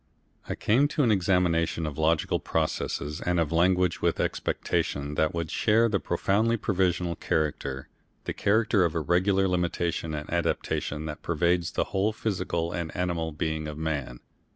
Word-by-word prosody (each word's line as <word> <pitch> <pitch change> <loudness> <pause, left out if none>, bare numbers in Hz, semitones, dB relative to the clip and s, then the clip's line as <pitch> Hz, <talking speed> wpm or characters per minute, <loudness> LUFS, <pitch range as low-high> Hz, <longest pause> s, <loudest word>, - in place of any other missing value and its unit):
I - - -1
came 130 +7 +3
to 150 0 0
an 115 - +4
examination 85 -4 +1
of 75 -2 -4
logical 80 0 +2
processes 75 -2 -2
and 90 -1 +1
of 80 -3 0
language 90 +1 +2
with - - +2
the - - 0
expectation 70 +1 -1
that 80 +1 +1
they - - -6
would 85 -2 -3
share 115 +2 +3
the 105 -3 0
profoundly 110 +6 +1
provisional 90 -4 0
character, 70 -4 -2 0.4
the - - -3
character 110 -1 +2
of 85 -1 0
irregular 95 +4 +2
limitation 85 -3 -1
and 75 0 -5
adaptation 80 -2 -1
that 75 -1 -6
pervades 85 +1 +1
the - - +1
whole 100 +2 +1
physical 90 -6 -2
and 85 -2 -3
animal 85 -3 -1
being 80 0 -2
of 75 0 -6
man. 70 -6 -3
85 Hz, 160 wpm, -27 LUFS, 80-95 Hz, 0.4 s, an